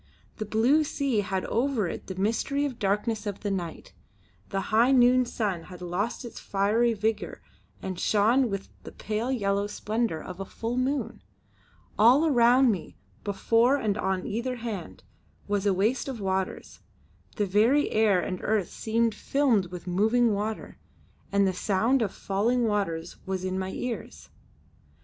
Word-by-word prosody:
The 215 - -4
blue 245 +9 +3
sea 280 -6 -1
had 190 -1 -2
over 240 -4 0
it - - -6
the 190 - -5
mystery 230 +9 0
of 285 - -1
the 245 - -16
darkness 210 +2 -1
of 200 -1 -4
the 205 - -2
night; 175 -4 -5 0.6
the 195 - -1
high 235 +4 +5
noon 250 -1 +5
sun 195 -9 -2
had 180 -1 -11
lost 180 +8 -3
its 235 - -8
fiery 215 +4 +1
vigour 220 +1 -2 0.4
and 185 -2 -4
shone 230 +5 +3
with 195 -1 -4
the - - -10
pale 220 +4 -3
yellow 200 -4 0
splendour 215 -3 -2
of 180 +3 -9
a - - -2
full 230 +4 -4
moon. 265 +3 -1 0.8
All 250 +9 +6
around 250 -2 +5
me, 185 -6 -5 0.3
before 230 +5 +2
and 215 -6 0
on 190 -2 -1
either 240 +4 -2
hand, 225 -8 -6 0.4
was 205 0 0
a - - +4
waste 215 +9 0
of 260 -4 -5
waters; 190 -1 -3 0.6
the 210 - 0
very 220 +9 +3
air 215 -4 +3
and 185 +1 -3
earth 210 -4 0
seemed 230 0 0
filmed 235 -5 +1
with 175 -1 -9
moving 220 +6 +2
water, 210 +2 -4 0.5
and 200 0 +3
the 190 - +1
sound 220 +8 +1
of 205 -4 0
falling 230 +6 0
waters 200 -7 -1
was 190 -1 -2
in 185 0 -2
my 190 0 -3
ears. 240 +4 -6
215 Hz, 160 wpm, -27 LUFS, 195-240 Hz, 0.8 s, All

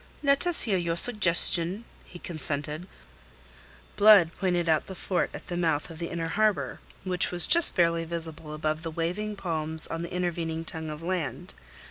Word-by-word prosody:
"Let 280 +4 +2
us 350 - +2
hear 195 -5 0
your 170 -1 -2
suggestion," 185 -1 +3 0.2
he 175 - -12
consented. 155 0 -5 1.1
Blood 205 -5 +6
pointed 175 -3 -1
out 160 -1 +1
the 190 - -8
fort 185 0 -2
at - - -10
the 175 - -6
mouth 165 -2 -1
of 160 - -11
the 170 - -4
inner 165 -1 -4
harbour, 215 +2 0 0.2
which 180 -2 +2
was 175 -2 +2
just 340 0 +6
barely 170 -1 +2
visible 160 -2 -7
above 155 0 -2
the 165 - -5
waving 180 +7 -3
palms 160 -4 -1
on 165 - -3
the 170 - -7
intervening 165 -2 -3
tongue 160 -1 -6
of 150 +1 -8
land. 180 0 -4
170 Hz, 170 wpm, -27 LUFS, 160-185 Hz, 1.1 s, Blood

